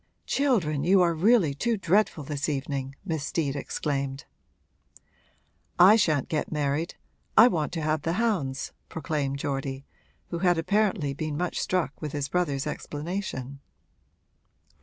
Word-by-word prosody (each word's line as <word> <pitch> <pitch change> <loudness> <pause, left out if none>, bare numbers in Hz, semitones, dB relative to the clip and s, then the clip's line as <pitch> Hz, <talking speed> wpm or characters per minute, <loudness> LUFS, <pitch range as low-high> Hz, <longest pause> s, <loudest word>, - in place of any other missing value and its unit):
'Children, 185 - +1
you 190 +4 +5
are 170 -1 +2
really 180 -2 +3
too 230 +11 0
dreadful 190 -3 +1
this 145 +1 -3
evening!' 135 -1 -3
Miss 160 -6 -2
Steet 145 -2 -1
exclaimed. 140 -1 -3 1.5
'I 190 +5 +8
shan't 155 - +2
get 155 - -2
married 150 +2 -1 0.4
I 230 - +10
want 160 -10 -1
to 165 -3 -3
have 155 0 0
the 165 +3 -1
hounds,' 180 - -1 0.2
proclaimed 150 -4 -2
Geordie, 135 -1 -3 0.4
who 170 - -3
had 175 -1 +3
apparently 195 -4 +1
been 155 0 -3
much 180 +1 -2
struck 175 -7 -1
with 150 -2 -4
his 145 -2 -2
brother's 145 -6 0
explanation. 150 -3 -5
155 Hz, 135 wpm, -27 LUFS, 140-180 Hz, 1.5 s, I